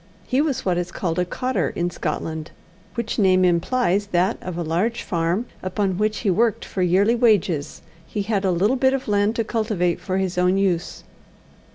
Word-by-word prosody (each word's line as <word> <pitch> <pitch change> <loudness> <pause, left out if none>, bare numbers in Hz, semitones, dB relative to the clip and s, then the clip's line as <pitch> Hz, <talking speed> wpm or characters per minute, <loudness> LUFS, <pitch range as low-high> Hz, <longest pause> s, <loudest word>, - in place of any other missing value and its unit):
He 260 +2 +1
was 295 -5 -1
what 180 -2 +1
is 175 0 -4
called 170 -1 -2
a 180 - +2
cottar 255 +8 -1
in 175 +1 -1
Scotland, 160 -1 -4 0.5
which 235 -2 -2
name 185 -2 +4
implies 195 +3 +1
that 185 +3 +1
of 180 -2 -5
the 170 - -2
large 190 +9 -1
farm 170 +6 -1 0.2
upon 190 0 -1
which 215 0 0
he 205 - +2
worked 225 +3 +1
for 190 - -4
yearly 190 +5 +3
wages 205 - +1 0.2
he 205 - -3
had 205 -1 -1
a 190 - +2
little 200 +9 +2
bit 265 +1 +3
of 270 - -5
land 205 +1 +2
to 230 - 0
cultivate 215 -6 -1
for 185 0 -2
his 185 -2 -1
own 180 +1 +3
use. 180 -3 -1
190 Hz, 190 wpm, -22 LUFS, 175-225 Hz, 0.5 s, name